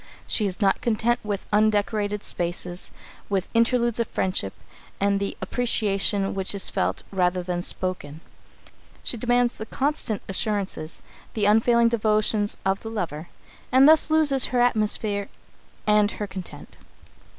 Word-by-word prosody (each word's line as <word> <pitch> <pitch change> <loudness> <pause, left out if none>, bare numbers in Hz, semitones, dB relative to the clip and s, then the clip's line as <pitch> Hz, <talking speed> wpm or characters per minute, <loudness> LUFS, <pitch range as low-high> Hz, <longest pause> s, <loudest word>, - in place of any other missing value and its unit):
She 210 - +1
is 185 - -4
not 195 -2 +2
content 235 +1 +1
with 205 -2 -4
undecorated 210 -1 +1
spaces; 175 +1 -3 0.4
with 195 -2 -1
interludes 235 0 +2
of 235 - 0
friendship 185 - -2 0.5
and 200 0 +1
the 200 - -4
appreciation 205 -4 0
which 195 +1 -1
is 195 - +3
felt, - - -1
rather 180 -1 0
than 175 -1 -3
spoken. 175 -5 -3 0.8
She - - -1
demands 245 +1 +1
the 220 - -7
constant 265 -7 -2
assurances, 195 -5 -2 0.3
the 210 -2 0
unfailing 230 +3 +4
devotion 215 -2 +1 0.2
of 190 +1 0
the 225 - -6
lover, 175 -7 -5 0.4
and 260 +2 +6
thus 315 0 +5
loses 300 -4 +3
her 250 - -1
atmosphere 215 -3 +3 0.6
and 210 -1 +4
her 210 - -4
content. 190 -3 -9
210 Hz, 135 wpm, -24 LUFS, 195-235 Hz, 0.8 s, and